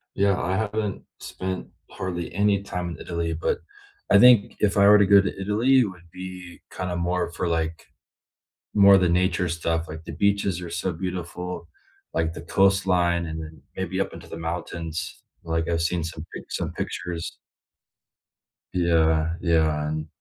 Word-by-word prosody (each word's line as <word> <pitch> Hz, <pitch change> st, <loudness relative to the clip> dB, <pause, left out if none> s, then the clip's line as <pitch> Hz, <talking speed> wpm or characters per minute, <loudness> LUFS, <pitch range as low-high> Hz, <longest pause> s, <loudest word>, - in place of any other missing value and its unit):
Yeah, 100 Hz, -1 st, +2 dB
I 95 Hz, +2 st, -1 dB
haven't 105 Hz, -2 st, -2 dB, 0.2 s
spent 95 Hz, 0 st, -5 dB, 0.2 s
hardly 85 Hz, -2 st, -4 dB
any 100 Hz, +1 st, +2 dB
time 90 Hz, -3 st, -4 dB
in 85 Hz, -, -6 dB
Italy, 85 Hz, -1 st, -3 dB
but, 80 Hz, -, -1 dB, 0.5 s
I -, -, +8 dB
think 125 Hz, -4 st, +6 dB
if 105 Hz, -1 st, +2 dB
I 100 Hz, 0 st, +6 dB
were 105 Hz, 0 st, +8 dB
to 100 Hz, -, +4 dB
go 100 Hz, 0 st, +8 dB
to 95 Hz, 0 st, -4 dB
Italy, 115 Hz, +7 st, +3 dB
it 125 Hz, -, +4 dB
would 90 Hz, -4 st, -10 dB
be 90 Hz, -1 st, -9 dB
kinda 90 Hz, -1 st, -3 dB
more 90 Hz, 0 st, -1 dB
for, 85 Hz, +1 st, -2 dB
like 80 Hz, -1 st, -2 dB, 0.9 s
more 100 Hz, -1 st, +7 dB
of 95 Hz, -, +4 dB
the 90 Hz, -, +3 dB
nature 90 Hz, +1 st, +2 dB
stuff, 80 Hz, 0 st, -1 dB
like, 80 Hz, +1 st, -7 dB
the -, -, -6 dB
beaches 100 Hz, -3 st, +1 dB
are 85 Hz, -, -6 dB
so 85 Hz, +2 st, -2 dB
beautiful, 90 Hz, 0 st, -5 dB, 0.5 s
like, 80 Hz, 0 st, 0 dB
the -, -, -8 dB
coastline 90 Hz, -3 st, +2 dB
and 80 Hz, 0 st, -5 dB
then 80 Hz, -2 st, -10 dB
maybe 95 Hz, 0 st, -3 dB
up -, -, -3 dB
into 85 Hz, 0 st, -11 dB
the 80 Hz, -, -7 dB
mountains, 80 Hz, 0 st, -5 dB, 0.2 s
like, 80 Hz, 0 st, -1 dB
I've 85 Hz, -1 st, +1 dB
seen 85 Hz, 0 st, 0 dB
some 80 Hz, -1 st, -7 dB
pic -, -, -9 dB
some -, -, -2 dB
pictures. 90 Hz, -2 st, -4 dB, 1.4 s
Yeah, 80 Hz, -2 st, +2 dB
yeah, 80 Hz, -3 st, +2 dB
and 75 Hz, +1 st, -3 dB
90 Hz, 170 wpm, -25 LUFS, 80-95 Hz, 1.4 s, I